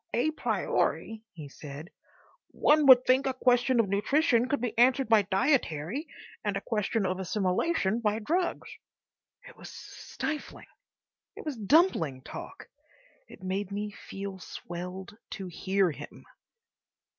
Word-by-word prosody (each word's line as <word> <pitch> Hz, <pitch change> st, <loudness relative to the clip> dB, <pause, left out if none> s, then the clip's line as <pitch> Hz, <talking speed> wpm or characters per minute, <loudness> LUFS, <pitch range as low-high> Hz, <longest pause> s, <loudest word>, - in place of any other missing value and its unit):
"A 300 Hz, +7 st, +2 dB
priori," 225 Hz, -6 st, -1 dB
he 155 Hz, -5 st, -9 dB
said, 145 Hz, +3 st, -10 dB, 0.6 s
"one 300 Hz, -1 st, +3 dB
would 255 Hz, -1 st, +9 dB
think 260 Hz, +2 st, +3 dB
a 265 Hz, -, -1 dB
question 250 Hz, 0 st, +3 dB
of 225 Hz, -, +3 dB
nutrition 245 Hz, -, +2 dB
could 285 Hz, -, +1 dB
be 245 Hz, -2 st, -3 dB
answered 255 Hz, +2 st, +4 dB
by 220 Hz, -2 st, +5 dB
dietary 200 Hz, -, 0 dB, 0.4 s
and 205 Hz, -2 st, -1 dB
a -, -, -4 dB
question 215 Hz, -1 st, 0 dB
of 185 Hz, 0 st, -1 dB
assimilation 195 Hz, -, 0 dB
by 215 Hz, -2 st, 0 dB
drugs." 340 Hz, -, -1 dB, 0.8 s
It -, -, -14 dB
was -, -, -10 dB
stifling. 305 Hz, -1 st, -6 dB, 0.7 s
It -, -, -10 dB
was 300 Hz, -3 st, -3 dB
dumpling 205 Hz, -, +2 dB
talk. -, -, -9 dB, 0.6 s
It 190 Hz, -, -14 dB
made 190 Hz, +1 st, -2 dB
me 205 Hz, +1 st, -3 dB
feel 195 Hz, -1 st, -8 dB
swelled 180 Hz, +3 st, -7 dB, 0.2 s
to 195 Hz, -, -6 dB
hear 190 Hz, +1 st, 0 dB
him. -, -, -11 dB
210 Hz, 135 wpm, -29 LUFS, 190-260 Hz, 0.8 s, would